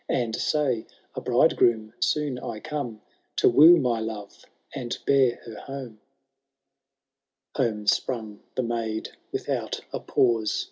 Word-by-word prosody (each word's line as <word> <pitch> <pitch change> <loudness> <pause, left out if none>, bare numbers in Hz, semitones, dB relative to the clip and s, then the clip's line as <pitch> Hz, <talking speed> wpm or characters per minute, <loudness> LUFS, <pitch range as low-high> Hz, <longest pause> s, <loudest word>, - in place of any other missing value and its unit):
And 115 -3 0
say, 135 -7 0 0.3
a - - -5
bridegroom 110 -2 +3
soon 145 -4 0
I 115 -3 -5
come, 140 -6 -5 0.3
To - - +4
woo 165 +4 +8
my 125 -6 +1
love, 110 -2 -7 0.3
and 120 -1 -4
bear 130 -3 +4
her 115 -2 -8
home/* 130 -6 -8 1.5
X. - - -11
Home 110 -6 0
sprung 110 -1 0 0.2
the 130 - 0
maid 115 -2 -2 0.2
without - - -2
a - - -2
pause. 115 -4 +1
120 Hz, 130 wpm, -26 LUFS, 110-135 Hz, 1.5 s, woo